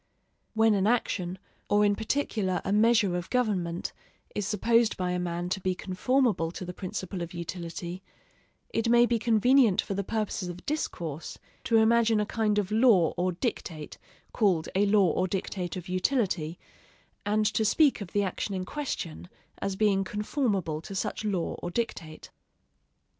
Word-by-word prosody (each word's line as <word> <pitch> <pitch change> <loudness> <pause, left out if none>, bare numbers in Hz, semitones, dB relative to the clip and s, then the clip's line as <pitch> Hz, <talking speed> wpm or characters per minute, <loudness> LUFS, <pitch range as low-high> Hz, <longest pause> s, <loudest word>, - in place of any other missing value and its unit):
When 220 0 +4
an 200 0 +2
action, 190 -6 0 0.3
or 205 0 +4
in 205 0 +3
particular 215 -5 -1
a - - -1
measure 215 -3 +4
of 175 -1 -4
government, 190 -9 -1 0.4
is 205 -2 -2
supposed 230 +2 +2
by 180 -1 -1
a 180 - -1
man 175 0 -2
to 185 - -1
be 185 0 0
conformable 200 -1 +1
to 185 - -6
the 180 - -6
principle 185 0 -5
of 170 +1 -6
utility, 170 +1 -5 0.7
it 225 0 0
may 240 0 +6
be 235 -1 +1
convenient 235 -1 +4
for - - 0
the 200 +1 -2
purposes 210 -3 -2
of 175 0 -9
discourse 170 - -4 0.3
to 230 - +3
imagine 225 0 +4
a 210 - +1
kind 215 -1 0
of 205 -1 0
law 215 -7 +4
or 180 +1 0
dictate 170 - -4 0.3
called 185 -7 +2
a 200 +2 +3
law 200 -4 +4
or 185 +3 0
dictate 185 -1 -3
of 180 - -7
utility, 185 - 0 0.7
and 215 +1 +1
to 220 - +1
speak 275 +3 +3
of 190 - -7
the 205 - +1
action 195 +1 -3
in 185 -1 -3
question 180 - -5 0.3
as 195 -1 -2
being 195 -1 +2
conformable 200 - -1
to 195 - -8
such 190 - -2
law 195 -5 -1
or - - -3
dictate. 170 -7 -4
195 Hz, 165 wpm, -28 LUFS, 180-220 Hz, 0.7 s, may